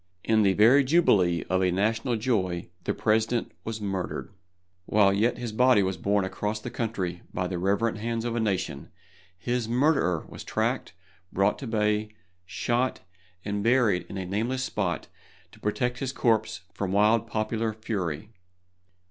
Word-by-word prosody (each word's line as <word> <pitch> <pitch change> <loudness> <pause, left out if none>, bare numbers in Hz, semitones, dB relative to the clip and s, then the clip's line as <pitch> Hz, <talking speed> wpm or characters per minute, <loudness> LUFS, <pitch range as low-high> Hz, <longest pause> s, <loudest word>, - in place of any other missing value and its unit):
In 110 -1 +3
the 100 -2 +4
very 120 +8 +6
jubilee 100 - +3
of 95 +1 0
a 90 -1 +2
national 110 +6 0
joy 95 -8 -1 0.2
the - - 0
President 110 +2 +1
was 110 0 -4
murdered. 95 -2 -4 0.6
While 100 -2 +4
yet 110 +5 +1
his 120 -2 -4
body 125 -1 +4
was 95 0 -1
borne 100 +3 +1
across 105 +3 -3
the 120 - -7
country 95 -8 -3
by 90 - -2
the 90 -1 -3
reverent 100 +4 0
hands 115 +1 -2
of 120 -1 -2
a - - 0
nation, 95 -10 -2 0.5
his 120 +3 -2
murderer 125 - +2
was - - -9
tracked, - - -1 0.4
brought 100 +2 +1
to 135 - -6
bay, 105 -1 0 0.4
shot, 120 +7 -1 0.4
and 100 0 -2
buried 115 -6 +3
in 100 - -6
a 95 - -3
nameless 115 +7 -1
spot 100 -7 -2 0.5
to - - -17
protect 125 +3 -1
his 135 -1 -2
corpse 110 -6 +1
from 100 -1 -3
wild 105 +3 +3
popular 110 +1 -1
fury. 105 -4 -4
110 Hz, 155 wpm, -27 LUFS, 95-115 Hz, 0.6 s, very